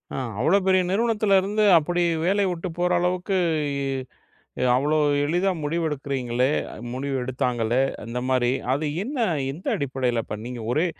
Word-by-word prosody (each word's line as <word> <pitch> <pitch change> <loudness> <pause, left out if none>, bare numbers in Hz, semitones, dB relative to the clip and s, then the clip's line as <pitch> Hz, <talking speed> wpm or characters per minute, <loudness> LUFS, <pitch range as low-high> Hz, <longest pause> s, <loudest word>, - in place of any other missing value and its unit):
ஆ. - - -3 0.2
அவ்வளோ 160 +11 +4
பெரிய 185 -1 +4
நிறுவனத்தில 210 -1 +2
இருந்து 210 +3 0
அப்படி 175 +3 0 0.2
வேலை 200 +3 +2
விட்டு 175 +1 -4
போற 180 0 +2
அளவுக்கு 180 +2 0 1.4
அவ்வளோ 145 +4 +1 0.3
எளிதா 175 +6 +1
முடிவெடுக்குறீங்களே 140 -5 -1 0.4
முடிவு 135 +2 -3
எடுத்தாங்களே 125 -1 0 0.2
அந்த 115 +2 -4
மாதிரி 125 -2 +2 0.2
அது 150 +3 -1 0.2
என்ன 275 +6 -5 0.3
எந்த 160 +7 -9
அடிப்படையில 130 -4 -1
பண்ணீங்க? 120 +4 -5
ஒரே 155 +7 +2
150 Hz, 125 wpm, -24 LUFS, 125-185 Hz, 1.4 s, அவ்வளோ